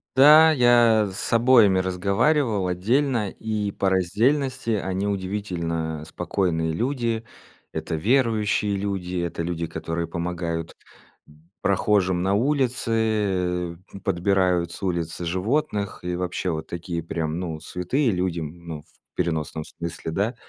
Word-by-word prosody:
Да, 155 +4 +8
я 120 -5 +4
с 95 - -2
обоими 115 -5 +5
разговаривал 100 - +1
отдельно 115 +5 +1
и 105 0 -3
по 95 - 0
раздельности 120 - +1
они 100 -2 -1
удивительно 85 -6 -3
спокойные 85 -2 -1
люди. 115 - -1 0.5
Это - - -3
верующие 105 - +1
люди, 95 -2 -3
это 85 -1 -3
люди, 85 -1 -3
которые 85 +1 -4
помогают, 85 -1 -3 0.5
м, 75 +2 -22
прохожим 95 -2 +2
на 95 +1 +1
улице, 110 - 0 0.3
подбирают 90 -2 +1
с 85 - -9
улицы 85 -2 -2
животных 100 - -1
и 90 0 -2
вообще 90 0 -2
вот 80 -1 -4
такие 85 -1 -4
прям 80 -1 -3
ну 80 -3 -4
святые 90 - -1
людям, 90 -4 -1
м, 85 +2 -14
ну 75 -2 -5
в - - -35 0.3
переносном 80 -3 -2
смысле, 85 -1 -6
да. 100 +9 -1
95 Hz, 125 wpm, -24 LUFS, 85-110 Hz, 0.5 s, Да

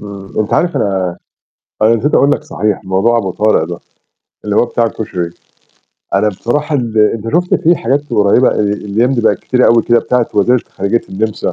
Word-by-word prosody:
امم، 100 -1 -10
أنت 110 0 -1
عارف 175 0 0
أنا 95 -2 0 0.8
أنا 110 +2 +4
نسيت 140 +7 -1
أقول 140 - +4
لك - - -1
صحيح، 105 -2 -2
موضوع 95 +5 +1
أبو 95 -5 -2
طارق 105 +3 +1
ده، - - -6 0.7
اللي 105 -1 -1
هو - - +4
بتاع 120 0 -1
الكشري. 90 -6 -4 0.8
أنا 100 +2 +2
بصراحة 145 - -2
ال 115 -4 -2
أنت 110 +2 +1
شُفت 180 +1 +2
في 170 +2 +2
حاجات 140 +5 -2
قريبة 105 +5 +3
الأيام 105 +4 0
دي 125 - 0
بقت 110 -2 +2
كتيرة 125 -1 +1
أوي 115 -1 +4
كده 120 0 +3
بتاعة 125 0 0
وزيرة 120 +5 +3
خارجية 100 +5 -1
النمسا 105 +2 -2
110 Hz, 180 wpm, -14 LUFS, 100-125 Hz, 0.8 s, أنا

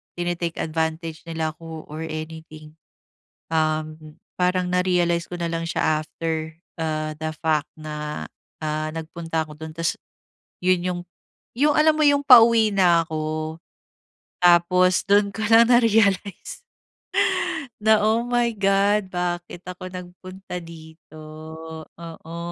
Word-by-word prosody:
tini-take 175 -1 -2
advantage 160 0 -2
nila 160 -1 -2
'ko, 160 -1 -9
or 155 - -6
anything. 155 0 -8 0.8
Uhm, 155 -1 -2 0.2
parang 180 0 +1
na-realize 175 -2 +2
ko 180 - -5
nalang 165 -1 -2
siya 155 -2 +1
after, 160 0 -4 0.3
ah, 155 -1 -2
the 155 0 -2
fact 155 -2 +1
na, 150 -1 -5 0.4
ah, 155 0 -2
nagpunta 165 0 -3
ako 150 - -11
dun 160 0 -7
tas, 165 0 -1 0.7
yun 185 -1 +3
yung 180 -1 -2 0.6
yung 295 +1 +4
alam 310 0 +5
mo - - +2
yung 285 0 +4
pauwi 230 -3 +7
na 175 -3 +4
ako. 155 0 -3 0.9
Tapos 180 +1 +5
dun 200 0 +4
ko 220 - -4
lang 230 +1 +7
na-realize 220 - +2 1.2
na, 220 0 +5
"Oh, 220 +2 +3
my 240 -1 +1
God, 195 0 +2
bakit 175 0 -3
ako 180 0 -7
nagpunta 180 +1 -8
dito?" 160 -1 -13 0.8
Oo. 165 0 -9
170 Hz, 120 wpm, -23 LUFS, 160-185 Hz, 1.2 s, pauwi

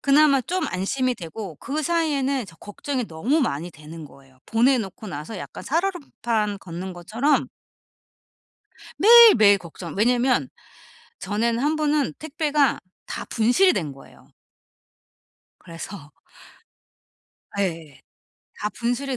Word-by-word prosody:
그나마 280 -1 +4
좀 350 +5 -2
안심이 250 +8 -1
되고 175 -2 -8
그 295 - -4
사이에는 280 - 0
저 165 -2 -15
걱정이 245 - -4
너무 235 - 0
많이 170 - -2
되는 155 +1 -11
거예요. 135 -2 -18
보내놓고 225 -3 +1
나서 150 +7 -6
약간 - - -8
살얼음판 265 - -1
걷는 185 +1 -7
것처럼 220 - 0 1.5
매일매일 415 - +8
걱정 170 -1 -9
왜냐하면 245 +3 +2 0.7
전에는 225 +4 -1
1 300 +4 +1
번은 300 -2 +1
택배가 300 -3 0 0.3
다 - - -5
분실이 245 - +3
된 155 -6 -3
거예요. 135 - -17 1.3
그래서 165 -2 -10 1.5
예. 165 -7 -3 0.6
다 210 - -1
분실이 245 +4 -2
230 Hz, 245 characters per minute, -23 LUFS, 180-285 Hz, 1.5 s, 매일매일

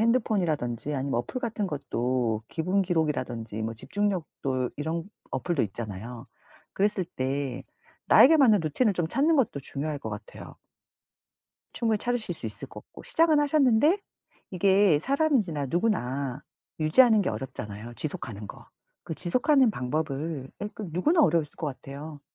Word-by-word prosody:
핸드폰이라든지 175 - +1
아니면 135 -2 -1
어플 255 - -6
같은 225 -4 -2
것도 125 - -1
기분 185 +4 0
기록이라든지 130 - -2
뭐 110 +1 -2
집중력도 140 - -2
이런 160 +3 -3 0.3
어플도 170 -5 -1
있잖아요. 110 +2 -5 0.5
그랬을 200 -1 +1
때 135 -3 -3 0.4
나에게 320 +4 +8
맞는 225 - +5
루틴을 200 - +1
좀 170 -2 0
찾는 295 - +2
것도 215 - +1
중요할 145 +2 -4
것 110 -5 -6
같아요. 105 0 -9 1.2
충분히 225 -2 +1
찾으실 245 0 -1
수 - - -6
있을 - - -7
것 - - -10
같고 - - -14
시작은 320 -2 +3
하셨는데 290 - +4 0.5
이게 190 -3 +4
사람인지라 245 - +1
누구나 140 - -1 0.4
유지하는 220 +8 +6
게 - - -1
어렵잖아요 110 -1 -6
지속하는 110 -8 -5
거. - - -12 0.4
그 165 - -5
지속하는 250 - +3
방법을 145 -1 -3
예 205 - -2
그 210 -5 -6
누구나 300 - +3
어려우실 155 -2 +1
것 160 - -3
같아요. 145 +2 -7
160 Hz, 340 characters per minute, -27 LUFS, 130-215 Hz, 1.2 s, 나에게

